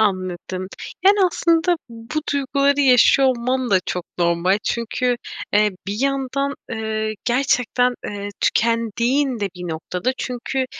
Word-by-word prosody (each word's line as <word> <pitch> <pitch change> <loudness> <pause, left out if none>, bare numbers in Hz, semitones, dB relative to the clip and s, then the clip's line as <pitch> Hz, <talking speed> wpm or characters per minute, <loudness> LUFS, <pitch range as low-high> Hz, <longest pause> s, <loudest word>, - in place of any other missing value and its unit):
Anladım, 185 -2 -1 0.4
yani, 405 +1 +6
aslında 340 0 +2
bu 230 +7 -5
duyguları 280 +1 +1
yaşıyor 265 0 +6
olman 255 0 -1
da 190 -2 +4
çok 180 -1 -3
normal. 170 +3 +2
Çünkü, 240 +1 0 0.4
eee, 210 0 +4 0.2
bir 200 - -2
yandan, 275 0 0 0.2
eee, 220 -1 -2
gerçekten, 250 0 +2
eee, 205 0 -5
tükendiğin 235 +3 +1
de 200 - 0
bir 180 -1 -6
noktada. 180 +9 -2
Çünkü, 255 +1 -2
240 Hz, 120 wpm, -21 LUFS, 205-270 Hz, 0.4 s, yani